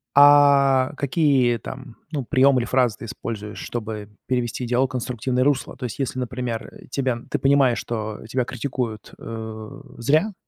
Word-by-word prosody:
А, 140 -2 +6
какие 135 -5 +2
там, 130 -2 -9 0.2
ну 140 -4 -2
приёмы 130 +1 +4
или - - -2
фразы 125 -4 +2
ты - - -7
используешь, 105 -1 -6
чтобы 110 -3 -5 0.2
перевести 125 0 -1
диалог 125 +2 +2
в - - -12
конструктивное 125 +1 -1
русло? 140 -2 0
То 125 - -5
есть, 110 - -5
если, 130 -1 -2
например, 125 -2 -4 0.2
тебя, 130 -3 0
ты - - 0
понимаешь, 135 -3 +4
что 110 -2 -4
тебя 125 0 0
критикуют, 120 -4 -4
э, 110 +4 -7 0.2
зря. 155 - +2
125 Hz, 155 wpm, -23 LUFS, 115-135 Hz, 0.2 s, А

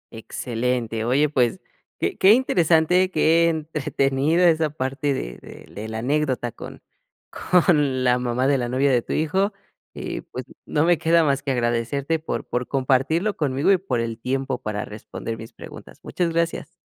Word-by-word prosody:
Excelente, 115 0 -3
oye 135 +5 +3
pues 135 +4 +1 0.4
que 400 - -2
qué 195 +2 +7
interesante, 180 -6 +3
qué 165 0 +3
entretenida 155 +1 +1
esa 160 -1 +2
parte 140 0 -2
de - - -6
de - - -13
de 105 +2 -6
la 110 0 -5
anécdota 130 -1 -1
con - - -11 0.7
con 150 -7 +3
la 125 0 +3
mamá 125 +1 -1
de 135 -1 +3
la 120 - -2
novia 135 +3 +2
de 125 -2 +3
tu - - -5
hijo. 190 +7 0 0.4
Y - - -5
pues, - - -8 0.2
no 150 +2 +1
me 175 -2 +4
queda 165 0 +4
más 140 -2 +1
que 140 - -4
agradecerte 125 +6 -1
por 155 - -4
por 125 0 -2
compartirlo 140 +9 +1
conmigo, 145 +4 +1
y 195 - +5
por 130 -10 -2
el 115 0 -4
tiempo 130 +1 -2
para 105 -2 -3
responder 110 +1 -7
mis 115 +2 -10
preguntas, - - -12
muchas 175 -2 -1
gracias. 165 0 -2
140 Hz, 165 wpm, -23 LUFS, 125-165 Hz, 0.7 s, qué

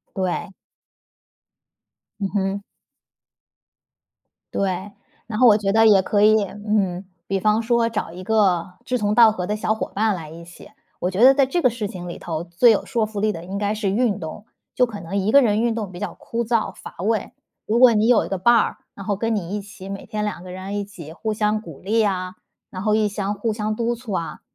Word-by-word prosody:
对。 185 -1 -2 1.7
嗯 195 - -1
哼。 195 0 -1 1.9
对， 190 +1 -2 0.4
然 215 -1 -4
后 250 - +7
我 210 -1 +7
觉 195 -2 0
得 225 +1 +5
也 200 -3 +6
可 205 +2 +1
以 215 0 +5
嗯， 200 -2 -2 0.2
比 195 0 0
方 215 +3 +2
说 235 0 +2
找 210 -7 -3
一 180 +2 -9
个 185 -4 +1
志 250 - 0
同 210 -1 0
道 225 -1 +7
合 180 -4 -4
的 210 +2 -1
小 215 0 0
伙 - - -4
伴 215 0 +1
来 160 -3 -8
一 165 +1 -10
起， 175 - -14 0.3
我 180 - -1
觉 200 +6 +1
得 265 +1 +9
在 275 -1 +3
这 345 +6 -1
个 255 - +5
事 220 -3 -4
情 180 -2 -8
里 170 - -6
头， 165 -1 -4
最 180 +8 +4
有 210 - 0
说 230 -5 0
服 210 -1 -6
力 215 +1 +2
的 165 -2 -7
应 195 +2 -5
该 205 +1 0
是 210 -2 -1
运 215 0 +1
动。 165 +6 -7 0.3
就 250 - +4
可 215 -4 -8
能 180 +2 -6
1 200 +2 +1
个 280 - +7
人 215 -2 +2
运 235 -1 +1
动 215 -4 -4
比 175 - -8
较 205 - -3
枯 235 +1 -4
燥 225 -4 0
乏 - - -11
味， 215 +3 -1 0.3
如 225 +3 +1
果 250 -2 +8
你 215 +2 +2
有 245 -3 +4
一 - - -7
个 195 - -2
伴 240 +6 +4
儿， 230 - +2 0.2
然 195 - -10
后 205 - +1
跟 225 +3 -1
你 200 -1 -3
一 205 - -3
起， 195 -1 -11
每 195 0 -6
天 210 -1 -3
2 185 -4 -4
个 180 - -9
人 190 +2 -5
一 205 - -1
起 175 -6 -11
互 220 +4 -3
相 215 0 0
鼓 165 -9 -11
励 220 +3 +1
啊， 185 -2 -2 0.3
然 185 +1 -7
后 215 -1 +2
一 215 -1 +3
相 200 0 -2
互 215 +2 -2
相 215 0 -2
督 235 +2 -1
促 235 -2 -9
啊， 170 -3 -3
205 Hz, 240 characters per minute, -22 LUFS, 190-220 Hz, 1.9 s, 得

